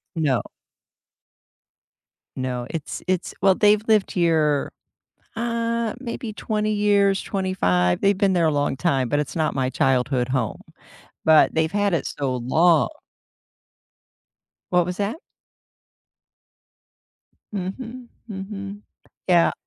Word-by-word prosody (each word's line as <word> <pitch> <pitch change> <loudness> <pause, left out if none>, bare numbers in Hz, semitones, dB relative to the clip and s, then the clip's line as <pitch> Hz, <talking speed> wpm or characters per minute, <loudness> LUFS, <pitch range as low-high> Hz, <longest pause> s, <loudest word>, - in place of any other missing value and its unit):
No. 140 -8 +1 2.0
No, 125 -2 -3
it's 160 -3 -5
it's 185 -1 -1
Well, 195 -1 +5
they've 210 0 +4
lived 215 -3 +3
here, 160 -5 +1 0.6
uh, 230 0 -1
maybe 235 -3 -5
20 215 -1 -2
years, 200 -2 +2
25. 90 - 0
They've 200 -1 +3
been 195 -2 +2
there 170 -2 +2
a 155 - +3
long 145 -2 0
time, 135 -8 0
but 145 - +1
it's 150 - -4
not 155 -3 0
my 130 -1 0
childhood 130 -1 +1
home, 125 -5 -2 0.6
but 160 -1 +5
they've 160 +1 +1
had 205 -2 +1
it 165 - 0
so 135 -3 -2
long. 160 +7 +3 1.8
What 180 -1 +3
was 180 +1 -4
that? 205 +10 -2 2.3
Mhm, 230 +6 -6 0.2
mhm. 200 0 -7 0.5
Yeah. 175 -2 +4
180 Hz, 115 wpm, -23 LUFS, 145-205 Hz, 2.3 s, Well